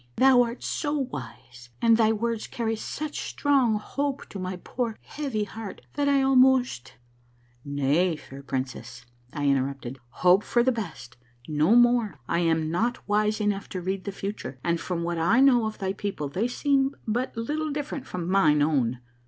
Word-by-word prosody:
Thou 260 -2 +6
art 235 0 -2
so 295 -1 -1
wise 125 - -7
and 230 -1 +5
thy 220 -1 +4
words 225 0 -2
carry 225 -2 -2
such 295 +7 -5
strong 270 -6 +2
hope 280 +5 -3
to 200 - -7
my 185 0 -3
poor, 225 +5 -4
heavy 270 -8 -3
heart 210 0 -8
that 285 -1 +1
I 275 -1 +3
almost 260 - +3 0.2
" 120 0 -35
— 120 0 -35
"Nay, 145 +5 +1
fair 140 -2 -11
princess," 130 -2 -5 0.3
I 145 -1 -3
interrupted, 135 -1 -1
"hope 180 - +4
for 240 - +2
the 260 - +3
best, 195 - -6 0.3
no 155 +8 +3
more. 240 - +4
I - - +1
am 160 -2 +1
not 235 +8 -1
wise 210 +1 +1
enough 205 -2 -1
to 185 - -4
read 190 +1 -3
the 200 - -3
future, 195 -10 -6
and 170 -1 0
from 175 -2 -3
what 170 -1 -2
1 230 +11 +4
know 245 -5 +4
of 215 - -6
thy 190 -1 -2
people 195 -8 -4
they 195 - -1
seem 275 +1 +1
but 240 +2 -2
little 300 +7 -2
different 290 -2 -4
from 175 -2 -4
mine 155 -6 +4
own. 130 -5 +1
205 Hz, 175 wpm, -26 LUFS, 150-245 Hz, 0.3 s, Thou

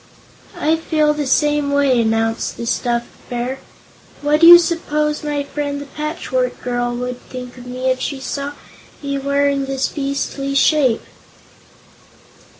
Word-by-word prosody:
"I 315 +2 +2
feel 310 -2 +1
the 295 -2 -3
same 295 +1 +2
way," 280 -4 +3
announced 225 0 0
the 235 - -5
stuffed 240 0 0 0.2
Bear. 250 +2 -3 0.6
"What 300 +2 +2
do 335 - +9
you 345 0 +13
suppose 300 -3 -1
my 295 -1 -1
friend 285 0 -4
the 285 - -7
Patchwork 315 - -3
Girl 245 -1 -1
would 250 0 -4
think 250 -1 -9
of 245 - -11
me, 255 +1 -3
if 255 - -1
she 270 +1 -3
saw 280 +2 -4 0.5
me 280 0 -2
wearing 280 0 +1
this 270 0 -1
beastly 275 -1 -3
shape?" 275 -4 +3
280 Hz, 145 wpm, -19 LUFS, 250-300 Hz, 0.6 s, you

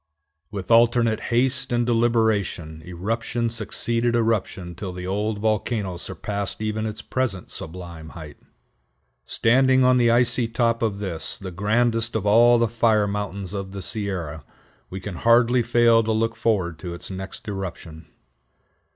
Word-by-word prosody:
With 100 0 -6
alternate 115 -1 +4
haste 130 +2 +1
and 120 0 +1
deliberation 110 -9 0
eruption 115 +7 -2
succeeded 115 +1 -1
eruption 105 -6 -1
till 90 +2 -6
the 90 0 -6
old 105 +3 -1
volcano 105 -3 -1
surpassed 100 +3 -4
even 110 0 -2
its 110 +1 -6
present 115 -9 -3
sublime 85 -3 -7
height. 80 -3 -10
[Illustration: - - -31
MOUNT - - -44
SHASTA] - - -4
Standing 130 +2 +4
on 125 0 +5
the 120 -1 +4
icy 120 0 +2
top 115 0 0
of 110 -4 0
this, 95 -6 -1
the 95 -2 -7
grandest 115 +5 +1
of 105 -2 -1
all 120 +3 +6
the 115 0 +2
fire 110 -2 +2
mountains 100 -2 -4
of 100 -1 -5
the 100 - -5
Sierra, 90 -8 -3 0.5
we 95 - -6
can 95 -1 -7
hardly 120 +3 +4
fail 115 0 +4
to 110 0 -1
look 115 +1 0
forward 95 -8 0
to 85 0 -6
its 85 - -7
next 95 +2 -8
eruption. 85 -5 -6
110 Hz, 155 wpm, -23 LUFS, 95-115 Hz, 0.5 s, all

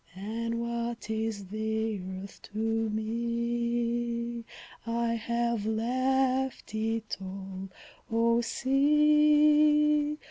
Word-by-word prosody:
And 225 +4 -3
what 235 -1 -3
is 220 -3 -3
the 220 0 -2
Earth 190 +1 -8
to 210 - -8 0.3
me! 235 +1 -1 0.4
I 235 0 0
have 235 -1 -1
left 260 +3 0
it 220 0 -2
all, 190 0 -7 0.4
O 230 +1 +3
Sea! 300 +2 +4
235 Hz, 80 wpm, -29 LUFS, 220-255 Hz, 0.4 s, Sea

